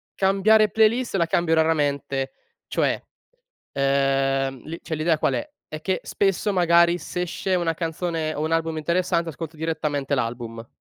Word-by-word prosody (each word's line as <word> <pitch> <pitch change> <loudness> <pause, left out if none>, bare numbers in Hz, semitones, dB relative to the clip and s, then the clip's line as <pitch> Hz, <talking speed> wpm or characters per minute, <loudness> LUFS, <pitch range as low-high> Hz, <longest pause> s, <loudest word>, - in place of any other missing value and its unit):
cambiare 205 +3 +4
playlist, 225 +2 +2
la 170 -3 +3
cambio 165 -1 +2
raramente, 140 -4 0 0.3
cioè - - 0 0.7
ehm, 135 -1 +1
l 165 - -4
cioè 160 - -4
l'idea 155 0 +1
qual - - +1
è, 305 - -3 0.2
è 155 0 -6
che 185 +2 -1
spesso 200 +1 0
magari 170 -1 +4
s'esce 180 +2 -3
una 170 -2 +1
canzone, 165 -1 -2
o 150 - -3
un 160 - -1
album 165 -1 0
interessante 170 +1 0
ascolto 160 +1 -8
direttamente 150 -3 -1
l'album. 115 -2 -4
165 Hz, 145 wpm, -24 LUFS, 140-180 Hz, 0.7 s, cambiare